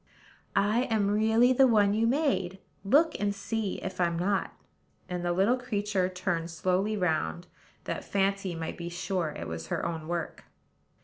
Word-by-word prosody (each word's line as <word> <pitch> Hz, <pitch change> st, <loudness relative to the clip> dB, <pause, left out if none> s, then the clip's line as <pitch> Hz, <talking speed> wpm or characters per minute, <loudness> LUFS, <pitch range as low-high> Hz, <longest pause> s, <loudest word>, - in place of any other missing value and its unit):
"I 215 Hz, +5 st, +2 dB
am 210 Hz, -4 st, +1 dB
really 220 Hz, +4 st, +4 dB
the 265 Hz, +1 st, +6 dB
one 205 Hz, -4 st, +4 dB
you 225 Hz, +2 st, +2 dB
made: 245 Hz, -, +1 dB, 0.3 s
look, 295 Hz, +11 st, +4 dB
and 205 Hz, 0 st, 0 dB
see 205 Hz, 0 st, -2 dB
if 185 Hz, -1 st, -4 dB
I'm 170 Hz, -1 st, +1 dB
not;" 195 Hz, +3 st, 0 dB, 0.6 s
and 180 Hz, -1 st, -4 dB
the 175 Hz, -, 0 dB
little 195 Hz, +8 st, +3 dB
creature 205 Hz, -6 st, -1 dB
turned 180 Hz, -2 st, -2 dB
slowly 185 Hz, +5 st, 0 dB
round, 175 Hz, -1 st, -1 dB, 0.4 s
that -, -, -4 dB
Fancy 195 Hz, -2 st, 0 dB
might 165 Hz, -1 st, -5 dB
be 170 Hz, 0 st, -4 dB
sure 180 Hz, -1 st, -2 dB
it -, -, -5 dB
was 80 Hz, 0 st, -6 dB
her -, -, -2 dB
own 160 Hz, -2 st, -4 dB
work. 170 Hz, -1 st, -4 dB
195 Hz, 165 wpm, -29 LUFS, 175-215 Hz, 0.6 s, the